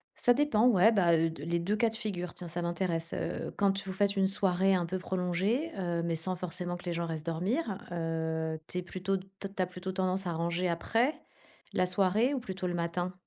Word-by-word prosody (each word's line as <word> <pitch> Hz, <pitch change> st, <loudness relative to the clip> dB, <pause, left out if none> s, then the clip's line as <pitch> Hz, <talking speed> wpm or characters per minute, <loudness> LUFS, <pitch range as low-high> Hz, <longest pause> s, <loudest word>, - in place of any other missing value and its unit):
Ça 245 Hz, -, +4 dB
dépend 250 Hz, -4 st, +3 dB
ouais. 220 Hz, -2 st, +6 dB
Bah, 175 Hz, -6 st, +4 dB
heu, 165 Hz, +1 st, +2 dB
de 145 Hz, -3 st, -9 dB
les 170 Hz, +2 st, 0 dB
2 190 Hz, +5 st, 0 dB
cas 225 Hz, +1 st, +3 dB
de 225 Hz, -, -4 dB
figure, 190 Hz, -6 st, -3 dB
tiens, 175 Hz, -, -6 dB
ça 175 Hz, +1 st, -3 dB
m'intéresse. 170 Hz, -1 st, -1 dB
Heu, -, -, -3 dB
quand 200 Hz, -1 st, +2 dB
vous 190 Hz, -, -4 dB
faites 200 Hz, +1 st, +2 dB
une 195 Hz, -1 st, +3 dB
soirée 195 Hz, -1 st, +3 dB
un 175 Hz, -2 st, +1 dB
peu 185 Hz, +2 st, -3 dB
prolongée, 190 Hz, -, 0 dB
heu, 170 Hz, -2 st, -1 dB
mais 170 Hz, -1 st, 0 dB
sans 185 Hz, +3 st, -1 dB
forcément 180 Hz, 0 st, -3 dB
que 175 Hz, -, -14 dB
les 175 Hz, -, -1 dB
gens 170 Hz, 0 st, -1 dB
restent 160 Hz, -1 st, -4 dB
dormir, 195 Hz, -, -1 dB
heu, 160 Hz, -1 st, -2 dB
tu -, -, -5 dB
es -, -, -2 dB
plutôt, 190 Hz, +2 st, -1 dB
tu 185 Hz, -, -8 dB, 0.2 s
as -, -, -3 dB
tu 195 Hz, -1 st, -3 dB
as -, -, +1 dB
plutôt 180 Hz, +1 st, -6 dB
tendance 185 Hz, 0 st, 0 dB
à 170 Hz, -, -1 dB
ranger 170 Hz, +2 st, 0 dB
après? 230 Hz, -, +1 dB, 0.6 s
La 185 Hz, -, +2 dB
soirée 200 Hz, +8 st, +2 dB
ou -, -, -1 dB
plutôt 190 Hz, -5 st, -4 dB
le 175 Hz, -, -1 dB
matin? 175 Hz, +1 st, -1 dB
180 Hz, 230 wpm, -31 LUFS, 170-195 Hz, 0.6 s, ouais